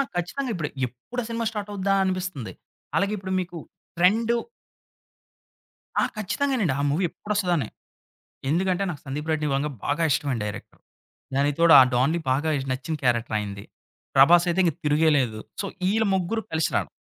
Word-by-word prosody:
ఖచ్చితంగా 215 +11 -2
ఇప్పుడు, 155 -6 -3 0.2
ఎప్పుడు 130 - -7
ఆ - - -8
సినిమా 230 0 -2
స్టార్ట్ 210 -2 -5
అవుద్దా 195 0 0
అనిపిస్తుంది. 185 - -3 0.4
అలాగే 200 +1 +1
ఇప్పుడు 190 -1 -4
మీకు 175 -1 -5 0.4
ట్రెండు 220 +7 +3 1.6
ఆ! - - +3
ఖచ్చితంగానండి. 215 - 0
ఆ - - +1
మూవీ 155 +7 0
ఎప్పుడు 210 +5 -5
వస్తదా 185 -3 +1
అని. 125 -8 -2 0.8
ఎందుకంటే, 185 +3 +1
నాకు 150 -5 -7
సందీప్ 150 +3 -4
రెడ్డి 155 -1 0
వంగా 145 +2 0
బాగా 145 +3 0
ఇష్టమైన 140 -4 0
డైరెక్టర్. 105 +1 -7 0.6
దానికి 140 +1 +1
తోడు 165 -1 +7
ఆ - - +10
డాన్‌లీ 135 +7 +2
బాగా 140 +5 +1 0.2
నచ్చిన 145 +5 -3
క్యారెక్టర్ 120 -3 +1
ఆయనది. 100 -1 -5 0.5
'ప్రభాస్' 170 +6 +7
అయితే 175 +2 +1
ఇంక 165 -4 +2
తిరిగేలేదు. 150 -6 +2 0.2
సో, - - -2 0.2
వీళ్ళు 215 +4 +2
ముగ్గురు 190 +5 -1
కలిసి 160 0 +1
రావడం - - 0
170 Hz, 155 wpm, -25 LUFS, 140-190 Hz, 1.6 s, ఆ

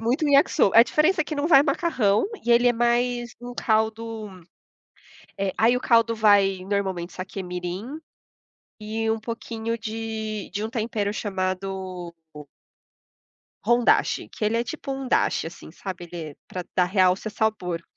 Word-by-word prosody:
muito 245 +7 0
um - - +2
Yakisoba, 275 -7 +4
a - - +11
diferença 315 +7 +2
é - - -17
que 300 - -5
não 290 +2 -1
vai 275 -5 +8
macarrão 275 - +1 0.2
e 240 - +3
ele 240 +1 +5
é - - +4
mais 240 0 0
um 245 0 -7
caldo 220 -1 -1 1.1
eh, 195 -1 -1
aí 235 +3 +4
o - - -2
caldo 230 -1 +3
vai 200 -3 +4
normalmente 190 -3 -2
saque 185 +1 -6
mirim 180 - -5 0.8
e 220 +1 -3
um 220 0 0
pouquinho 230 0 -4
de 220 -1 -5
de 205 +1 -2
um - - -2
tempero 220 -3 -2
chamado 185 -3 -4 0.2
o 150 0 -9 1.2
hondashi 240 +2 +2
que 220 - -5
ele 220 +2 +1
é 235 - 0
tipo 305 0 -6
um 270 -1 -5
dashi, 245 - +1
assim, 165 -1 -10
sabe, 185 +1 -7
ele 165 -3 -6
é - - -14
pra 180 -1 -5
dar 180 - +3
realce 185 +2 +2
ao - - -10
sabor. 180 -6 -1
220 Hz, 165 wpm, -24 LUFS, 190-240 Hz, 1.2 s, a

